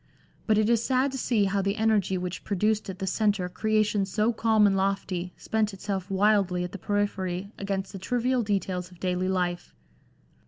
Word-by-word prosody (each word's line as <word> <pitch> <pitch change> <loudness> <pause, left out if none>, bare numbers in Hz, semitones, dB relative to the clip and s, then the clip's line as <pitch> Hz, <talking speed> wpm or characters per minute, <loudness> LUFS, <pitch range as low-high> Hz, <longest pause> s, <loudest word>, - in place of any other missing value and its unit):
But 215 -2 +4
it 215 0 +3
is 235 -1 +2
sad 260 +2 +2
to 265 - -4
see 230 -4 +2
how 195 0 +1
the 200 +1 0
energy 215 -4 +2
which 180 0 -5
produced 210 +1 0
at 190 - -5
the 190 - -3
centre 205 -1 +1
creations 210 0 0
so 220 +2 +2
calm 220 -1 +3
and 195 -1 +3
lofty 190 -2 -1
spent 215 -2 -1
itself 195 -1 -4
wildly 195 -2 +2
at 180 - -5
the 200 - -7
periphery 200 -1 -2
against 195 -1 -3
the 195 - -6
trivial 245 +5 0
details 190 -4 -2
of 180 -2 -17
daily 185 +1 -1
life. 180 -2 -2
200 Hz, 185 wpm, -27 LUFS, 185-215 Hz, -, But